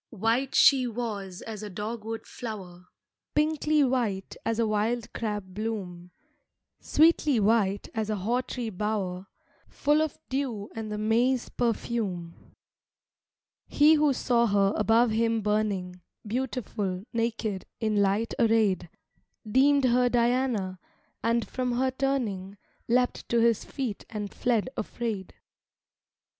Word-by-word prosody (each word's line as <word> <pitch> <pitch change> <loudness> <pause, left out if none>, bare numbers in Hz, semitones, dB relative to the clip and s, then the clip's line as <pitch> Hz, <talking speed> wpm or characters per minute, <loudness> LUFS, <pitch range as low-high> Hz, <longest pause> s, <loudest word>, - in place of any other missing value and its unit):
III 230 - -12
White 235 +5 +1
she 260 -3 +6
was 210 -6 -5
as 215 -2 -7
a 210 - -6
dogwood 220 +3 -5
flower, 190 -7 -8 0.5
Pinkly 305 0 +2
white 235 -7 -1
as 225 - -1
a 230 - +2
wild 220 +2 -1
crab 210 -4 -4
bloom, 190 -5 -5 0.7
Sweetly 305 -5 +3
white 205 -2 +2
as 220 -1 -2
a 215 - 0
hawtree 235 +3 -2
bower 195 -2 -2 0.4
Full 295 +2 +2
of 315 -1 -2
dew 250 -6 -3
and 220 -1 -5
the 210 - -3
May's 235 +4 +1
perfume. 215 -7 -2 1.3
He 300 +2 +5
who 300 -2 +4
saw 240 -2 +2
her 200 -1 +3
above 225 +2 +3
him 225 0 +1
burning, 200 -4 -1 0.2
Beautiful, 215 -5 -3
naked, 230 -4 -2
in 215 -3 +1
light 200 +3 +1
arrayed, 220 -6 +2 0.6
Deemed 275 +5 +4
her 250 0 +3
Diana, 235 -6 +1 0.4
and 230 0 +1
from 250 -1 -2
her 260 +2 +1
turning, 235 -8 -2 0.3
Leapt 245 +1 +1
to 235 - +3
his 230 -2 +3
feet 250 -7 -4
and 210 -3 -5
fled 235 -4 +1
afraid. 215 -4 -4
225 Hz, 125 wpm, -27 LUFS, 205-245 Hz, 1.3 s, she